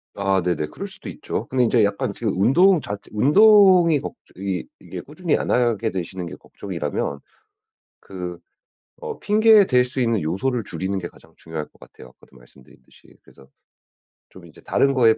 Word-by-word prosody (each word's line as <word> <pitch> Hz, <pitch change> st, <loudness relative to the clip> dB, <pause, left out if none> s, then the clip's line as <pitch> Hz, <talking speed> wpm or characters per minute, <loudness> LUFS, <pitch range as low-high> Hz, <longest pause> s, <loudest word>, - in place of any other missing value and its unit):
아 95 Hz, -2 st, +1 dB
네네. 85 Hz, -4 st, -1 dB
그럴 200 Hz, -, -8 dB
수도 190 Hz, +1 st, -11 dB
있죠. -, -, -5 dB
근데 125 Hz, -1 st, +1 dB
이제 115 Hz, -1 st, +3 dB
약간 100 Hz, 0 st, -1 dB
지금 110 Hz, -2 st, -2 dB
운동 160 Hz, -, +4 dB
자체 100 Hz, 0 st, -7 dB
운동이 180 Hz, -, +5 dB
걱 -, -, -7 dB, 0.2 s
이 95 Hz, -1 st, -3 dB
이게 -, -, -8 dB
꾸준히 155 Hz, +2 st, -2 dB
안 -, -, -4 dB
하게 115 Hz, -2 st, +1 dB
되시는 90 Hz, 0 st, -5 dB
게 85 Hz, -, -8 dB
걱정이라면 70 Hz, -, -5 dB, 0.8 s
그 90 Hz, -2 st, -8 dB, 0.6 s
어 -, -, -6 dB
핑계 215 Hz, 0 st, +5 dB
댈 125 Hz, -1 st, +3 dB
수 130 Hz, +1 st, -5 dB
있는 115 Hz, -4 st, +1 dB
요소를 110 Hz, +10 st, -1 dB
줄이는 95 Hz, +3 st, -4 dB
게 85 Hz, -, -5 dB
가장 80 Hz, -, -21 dB
중요할 80 Hz, -2 st, -6 dB
것 -, -, -28 dB
같아요 -, -, -15 dB
아까도 65 Hz, -, -22 dB
말씀드렸듯이. -, -, -21 dB
그래서 65 Hz, -, -20 dB, 0.8 s
좀 95 Hz, -2 st, -15 dB
이제 80 Hz, -, -17 dB
다른 140 Hz, 0 st, +1 dB
것에 115 Hz, -4 st, +4 dB
110 Hz, 340 characters per minute, -22 LUFS, 90-145 Hz, 0.8 s, 운동이